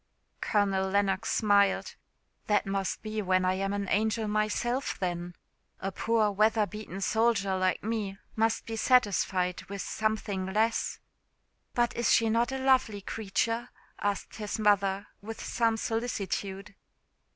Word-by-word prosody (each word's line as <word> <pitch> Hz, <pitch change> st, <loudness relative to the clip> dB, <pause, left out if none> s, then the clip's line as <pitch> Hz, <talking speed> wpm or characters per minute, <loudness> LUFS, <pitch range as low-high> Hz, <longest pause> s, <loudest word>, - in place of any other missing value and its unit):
Colonel 195 Hz, -2 st, +1 dB
Lennox 200 Hz, +1 st, +1 dB
smiled 200 Hz, -2 st, +3 dB, 0.5 s
"That 210 Hz, -1 st, +2 dB
must 195 Hz, -1 st, -2 dB
be 215 Hz, 0 st, -3 dB
when 185 Hz, -1 st, +2 dB
I 185 Hz, -, +3 dB
am 195 Hz, +1 st, -1 dB
an 200 Hz, -1 st, -2 dB
angel 220 Hz, +2 st, +1 dB
myself 215 Hz, +5 st, 0 dB
then. 175 Hz, -1 st, -3 dB, 0.4 s
A 195 Hz, -, -3 dB
poor 220 Hz, +1 st, +1 dB
weather 215 Hz, +1 st, +3 dB
beaten 205 Hz, -2 st, -7 dB
soldier 220 Hz, -3 st, +2 dB
like 185 Hz, 0 st, 0 dB
me 210 Hz, -3 st, -2 dB, 0.2 s
must 225 Hz, 0 st, +1 dB
be 225 Hz, -, -4 dB
satisfied 195 Hz, -7 st, +2 dB
with 200 Hz, -1 st, -5 dB
something 215 Hz, -3 st, -2 dB
less." 220 Hz, +4 st, 0 dB, 0.8 s
"But 240 Hz, -1 st, +1 dB
is 235 Hz, -, +1 dB
she 225 Hz, -1 st, +4 dB
not 235 Hz, +3 st, +2 dB
a 265 Hz, -, -2 dB
lovely 260 Hz, -6 st, +2 dB
creature?" 230 Hz, +3 st, -2 dB, 0.3 s
asked 205 Hz, -1 st, -2 dB
his 210 Hz, -2 st, -3 dB
mother, 200 Hz, -2 st, +2 dB, 0.2 s
with 225 Hz, +2 st, -7 dB
some 230 Hz, -2 st, +1 dB
solicitude. 205 Hz, -4 st, -3 dB
210 Hz, 135 wpm, -29 LUFS, 195-225 Hz, 0.8 s, she